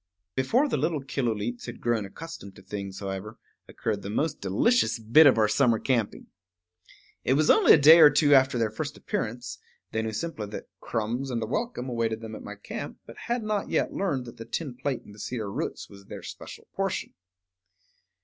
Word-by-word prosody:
Before 230 - +2
the - - 0
little 155 -5 -1
Killooleets 120 -4 -2
had 120 - -7
grown 115 -3 0
accustomed 150 -5 -10
to 95 - -15
things, 100 -2 -6
however, 100 +3 -5 0.3
occurred - - -3
the 100 - -6
most 145 +9 -1
delicious 110 - +2
bit 115 +8 +6
of 130 - +5
our 110 -1 +4
summer 120 0 +3
camping. 115 -4 -1 1.0
It 130 - +2
was 150 +1 +4
only - - +7
a - - +8
day 155 +3 +9
or 155 -2 +10
two 145 0 +4
after 135 -1 +5
their 115 -2 0
first 110 - -5
appearance; 120 +3 -4 0.3
they 110 - -1
knew 110 0 -3
simply 110 -2 -4
that 105 - -8
crumbs 120 +5 -2
and 115 -3 -2
a - - -1
welcome 135 - -3
awaited 115 -2 -1
them 110 -1 -7
at - - -7
my - - -8
camp, - - -7
but - - -12
had 240 -1 -1
not 215 -1 -1
yet - - 0
learned 145 -11 -1
that 120 - -11
the 115 - -8
tin 150 -7 -4
plate 135 +1 -3
in - - -13
the 105 - -14
cedar 110 -2 -4
roots - - -4
was 100 -1 -15
their - - -9
special - - -10
portion. - - -2
120 Hz, 195 wpm, -27 LUFS, 110-145 Hz, 1.0 s, or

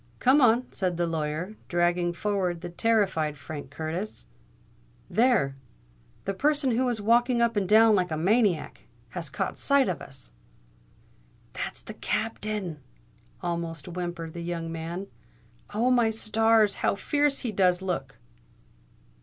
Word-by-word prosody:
"Come 265 - +4
on," 245 0 +4
said 180 -3 -1
the 175 - +1
lawyer, 160 +3 -3
dragging 175 0 +1
forward 180 -2 -1
the 175 - -5
terrified 190 -8 +1
Frank 145 -1 -8
Curtis. 160 - -4 0.9
"There! 225 - +3 0.7
the 195 - -1
person 285 +4 +2
who 250 +2 +1
is 235 -3 -1
walking 240 +3 +3
up 235 -1 +2
and 195 -3 0
down 220 +1 +7
like 180 -3 +2
a 155 - -2
maniac, 195 0 +1 0.2
has - - -5
caught - - -3
sight 280 -2 +4
of 170 -6 -2
us——" 135 - -11 1.2
"That's - - -5
the - - -8
Captain!" 215 -6 -3 0.6
almost 170 -3 -3
whimpered 175 -2 -5
the 170 - -6
young 170 -1 -4
man. 165 +4 -5 0.7
"Oh! 235 +4 +2
my 240 -3 +4
stars! 220 -1 +3
how - - +2
fierce 290 +6 +1
he 235 - 0
does 185 -2 +2
look!" 170 -8 -3
190 Hz, 135 wpm, -27 LUFS, 170-225 Hz, 1.2 s, down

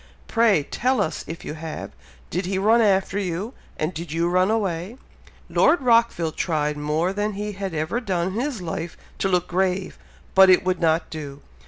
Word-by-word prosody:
Pray 225 -9 +3
tell 255 - 0
us 165 -5 -1
if 165 +1 -7
you - - -4
have? 160 0 -6 0.4
Did 180 +2 -2
he 190 0 -1
run 220 +4 +4
after 195 -2 +2
you, 195 +5 -3 0.2
and 155 +4 -2
did 170 -1 -6
you 165 +2 0
run 185 +2 +2
away?" 200 0 -1 0.5
Lord 345 - +4
Rockville 230 -10 +3
tried 150 -2 -1
more 155 +5 -1
than 205 +1 -1
he 210 +1 -4
had 195 -3 -5
ever 160 +9 -1
done 185 -5 -1
in - - -6
his 240 -2 -2
life 165 0 -5 0.2
to 195 - +1
look 180 -1 +1
grave, 185 +1 -1 0.3
but 190 0 +7
it 185 - +6
would 185 0 0
not 165 -1 +1
do. 145 -3 -7
185 Hz, 185 wpm, -23 LUFS, 165-205 Hz, 0.5 s, but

